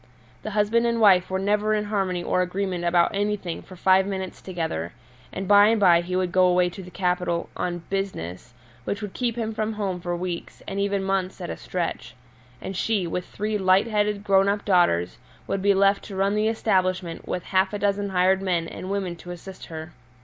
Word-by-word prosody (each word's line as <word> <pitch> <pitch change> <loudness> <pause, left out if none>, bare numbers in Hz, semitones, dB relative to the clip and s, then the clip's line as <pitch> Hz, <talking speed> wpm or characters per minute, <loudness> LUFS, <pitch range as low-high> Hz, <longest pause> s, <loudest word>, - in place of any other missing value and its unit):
The - - -5
husband 230 +3 +3
and 235 0 0
wife 190 -4 +5
were 190 - -1
never 210 +2 +1
in 210 - 0
harmony 195 -4 -1
or 185 - +1
agreement 180 -1 -2
about 170 0 +3
anything 205 -4 -2
for 185 - -13
five 190 +1 +4
minutes 190 -2 -5
together, 160 - -4 0.4
and 190 0 -5
by 205 +1 +7
and 225 0 +3
by 175 -4 +6
he 180 +1 -4
would 185 -1 0
go 185 0 +4
away 180 0 +3
to 190 - -9
the 180 - -10
capital 180 -2 -1
"on 175 -1 -3
business," 120 - -4 0.3
which 205 - -3
would 200 -2 -5
keep 240 -3 -1
him 225 -2 -3
from 215 0 -2
home 195 -4 -3
for 175 0 -2
weeks, 175 -1 -5
and 195 0 -3
even 200 -1 0
months, 190 -1 -1
at 175 - -5
a - - -4
stretch. 165 -9 -4 0.4
And 190 - -6
she, 205 -1 0
with 180 +1 -3
three 210 0 -2
light 190 0 +4
headed, 210 -2 0
grown 195 -1 +4
up 205 +1 -1
daughters, 175 - +2 0.3
would 195 - -2
be 200 0 +4
left 200 +1 +3
to 200 - -8
run 195 +1 +1
the 210 +1 +1
establishment 185 -6 0
with 180 - -3
half 190 0 +1
a 205 - -3
dozen 200 0 0
hired 190 +1 +3
men 175 -3 0
and 185 - -7
women 195 -3 -2
to 175 - -12
assist 180 +2 -9
her. 160 0 -7
190 Hz, 210 wpm, -24 LUFS, 180-205 Hz, 0.4 s, by